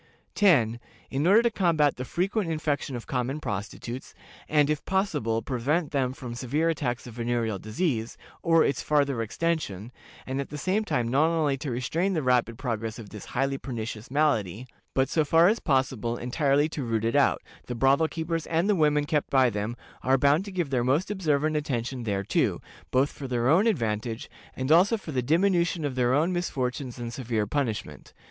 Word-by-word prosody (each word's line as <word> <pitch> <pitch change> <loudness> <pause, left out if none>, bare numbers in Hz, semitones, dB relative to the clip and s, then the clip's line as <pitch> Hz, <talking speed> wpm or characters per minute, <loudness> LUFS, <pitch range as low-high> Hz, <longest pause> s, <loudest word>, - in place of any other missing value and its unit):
"10. 120 - +3 0.3
In 140 +5 0
order 210 +5 +6
to 235 - +2
combat 160 -8 +2
the 125 - -5
frequent 185 - -1
infection 150 -4 -2
of 120 - -6
common 130 +2 -2
prostitutes, 115 +1 -6 0.3
and, 150 -2 +4
if 150 0 -1
possible, 150 - 0
prevent 145 +6 -1
them 130 -3 0
from 125 -2 -7
severe 140 +7 0
attacks 130 -7 -2
of 120 - -9
venereal 115 -3 -1
disease, 115 - -2 0.2
or 165 -1 +4
its 140 - 0
farther 140 -5 +1
extension, 115 - -2 0.3
and 135 +1 -2
at 140 - -7
the 150 - -6
same 190 +8 0
time 120 - -1
not 140 +6 +3
only 160 -4 +1
to 140 +1 -5
restrain 160 +11 -1
the 160 -4 -1
rapid 125 -3 +2
progress 115 -4 -3
of 110 -3 -9
this 105 -3 -9
highly 135 +1 -1
pernicious 115 -3 -6
malady, 125 - +1 0.3
but, 135 0 +3
so 155 +3 +1
far 165 +3 +5
as 220 +4 +2
possible, 130 - 0
entirely 140 +4 +1
to 150 -3 -5
root 115 -2 -1
it 115 - 0
out, 145 - +3 0.2
the 125 - -4
brothel 135 +6 +3
keepers 165 0 -3
and 165 +3 +1
the 210 - +4
women 150 -3 +2
kept 150 -1 0
by 130 -3 +4
them 105 +3 -3 0.3
are 135 +1 +3
bound 145 +6 +3
to 200 - -7
give 175 -6 -2
their 125 -3 +1
most 145 +11 +1
observant 155 -5 0
attention 130 -4 -2
thereto, 100 -2 0 0.3
both 135 +3 +2
for 135 - -7
their 120 -1 0
own 175 - +4
advantage, 115 - -2 0.2
and 130 +3 -2
also 185 +8 +5
for 180 -6 -8
the 130 -3 0
diminution 170 +3 +2
of 140 - -2
their 125 -1 +1
own 165 +5 +2
misfortunes 130 -7 -3
and 120 -1 -5
severe 115 -4 -1
punishment. 120 -2 -3
135 Hz, 185 wpm, -27 LUFS, 120-160 Hz, 0.3 s, order